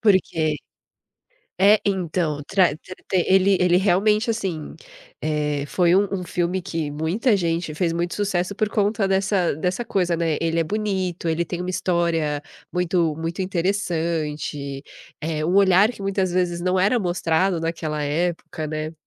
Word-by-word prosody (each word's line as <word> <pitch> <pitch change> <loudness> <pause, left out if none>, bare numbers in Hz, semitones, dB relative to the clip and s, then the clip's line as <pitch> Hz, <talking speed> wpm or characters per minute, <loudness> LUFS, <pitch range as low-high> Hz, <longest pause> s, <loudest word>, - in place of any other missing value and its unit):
Por 210 -3 +5
quê? 155 -1 -1 1.1
É, 205 +2 +6
então, 175 -6 -1
tra 185 -6 +3
te 185 +4 -11 0.2
te 190 - +2
ele 190 +1 +4
ele, 180 -1 +4
realmente, 210 +4 +2
assim, 190 -9 -3 0.5
eh, 150 -2 -1
foi 175 +3 +2
um 200 +1 +3
um 185 -2 -2
filme 180 +1 -1
que 165 -5 -3
muita 175 - +1
gente 165 -3 -1
fez 170 +2 0
muito 170 +1 -2
sucesso 195 -2 -1
por 215 +1 -1
conta 205 -1 +1
dessa 190 -3 +1
dessa 180 +8 -1
coisa, 180 -6 0
né, 165 -2 0
ele 165 0 0
é - - +2
bonito, 190 -2 -2
ele 165 +1 +1
tem 170 +1 -5
uma 180 +1 -3
história 165 -5 0 0.3
muito 175 -3 +1
muito 165 +3 -3
interessante, 165 -6 -2 0.4
eh, 155 -1 -2
um 175 +4 +1
olhar 195 +2 +5
que 235 - -15
muitas 195 -2 0
vezes 175 -1 0
não 185 +1 +1
era 205 +6 +3
mostrado 175 -1 +1
naquela 160 -2 -3
época, 160 +1 -2
né. 155 +1 -4
175 Hz, 155 wpm, -23 LUFS, 160-195 Hz, 1.1 s, É